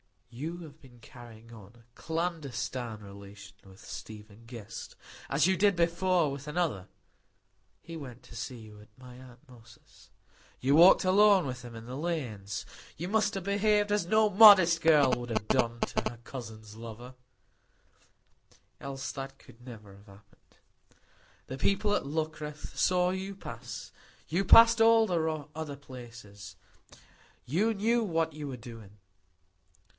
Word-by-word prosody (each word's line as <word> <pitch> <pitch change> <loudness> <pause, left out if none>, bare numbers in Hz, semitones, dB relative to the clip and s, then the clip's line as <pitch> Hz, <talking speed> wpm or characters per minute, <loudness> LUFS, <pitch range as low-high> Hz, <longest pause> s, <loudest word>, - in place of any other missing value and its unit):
"You 160 +8 -6
have 155 -2 -13
been 125 -4 -18
carrying 115 -1 -14
on 105 -2 -14
a 120 - -21
clandestine 140 -9 -4
relation 100 0 -12
with 95 0 -16
Stephen 105 +1 -10
Guest,—as 115 +5 -5
you 190 +1 +3
did 200 -1 +3
before 170 -1 +1
with 140 +1 -8
another. 150 - -2 0.9
He 165 +7 -9
went 130 -5 -10
to - - -14
see 125 +2 -6
you 110 -2 -13
at 105 - -17
my 125 -1 -13
aunt 130 +2 -16
Moss's; 120 -2 -19 0.5
you 135 +2 +1
walked 170 +5 +7
alone 195 0 +5
with 125 -2 -6
him 120 -1 -10
in 115 0 -10
the 125 +2 -7
lanes; 120 - -4 0.3
you 175 +4 -5
must 215 0 +1
have 195 - -4
behaved 205 +1 +1
as 205 -4 +1
no 215 +2 +3
modest 190 -5 +7
girl 150 -5 +5
would 120 -1 -3
have 110 -1 -2
done 120 -2 +1
to - - -1
her 120 - -11
cousin's 110 -5 -10
lover, 115 +2 -10 1.7
else 135 0 -6
that 135 0 -8
could 120 - -19
never 110 -5 -12
have 100 +2 -20
happened. 100 +1 -21 0.9
The 130 - -6
people 205 +4 +1
at 205 - -1
Luckreth 155 0 -5
saw 180 0 +2
you 190 +1 -5
pass; 120 - -9 0.4
you 180 +5 0
passed 230 +3 +7
all 225 0 +6
the 160 -5 -2
other 155 -2 -6
places; 115 -8 -12 0.9
you 200 - +1
knew 230 +3 +1
what 165 -6 -1
you 150 -1 -7
were 130 -2 -6
doing. 115 -4 -12
135 Hz, 145 wpm, -29 LUFS, 115-175 Hz, 1.7 s, walked